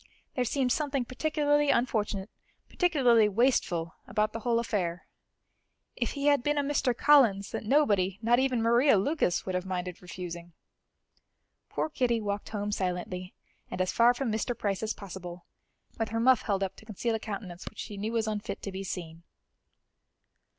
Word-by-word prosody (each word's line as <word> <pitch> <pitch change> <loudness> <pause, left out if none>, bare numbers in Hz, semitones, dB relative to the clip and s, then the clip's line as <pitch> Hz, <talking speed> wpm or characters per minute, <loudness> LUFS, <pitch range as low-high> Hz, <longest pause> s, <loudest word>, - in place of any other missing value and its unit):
There 250 -4 0
seemed 255 +1 0
something 280 -2 0
particularly 290 +2 +1
unfortunate, 215 -5 0 0.4
particularly 250 - +3
wasteful, 190 -7 +1
about 210 +1 0
the 230 - -4
whole 235 0 +1
affair! 185 -7 -2 0.9
If - - -2
he 280 -1 -3
had 285 -3 +4
been 295 +3 0
a 285 - +2
Mr. 275 -4 0
Collins, 240 -11 +4
that - - -4
nobody, 205 -8 +2
not 240 +2 +3
even 260 -3 +1
Maria 235 +1 +5
Lucas, 195 - 0
would 185 - -3
have 180 0 -1
minded 180 -1 -4
refusing! 175 -1 -8 1.2
Poor - - -1
Kitty 250 -6 0
walked 205 -1 -3
home 210 -1 -3
silently, 180 -1 -3 0.3
and - - -6
as 185 0 +1
far 240 +1 +4
from 245 -2 -2
Mr. 225 +3 -2
Price 200 -2 -1
as 220 0 -2
possible, 180 -3 -9 0.5
with 225 - -1
her 225 +1 -2
muff 255 +1 +5
held 200 -2 -1
up 190 0 -3
to - - -15
conceal 225 +2 -2
a 225 - -1
countenance 195 -5 -7
which - - -25
she 210 - -6
knew 210 +3 -3
was 225 -1 +1
unfit 210 -1 -4
to 200 - -4
be 190 +1 -5
seen. 170 -3 -6
220 Hz, 170 wpm, -29 LUFS, 190-250 Hz, 1.2 s, Maria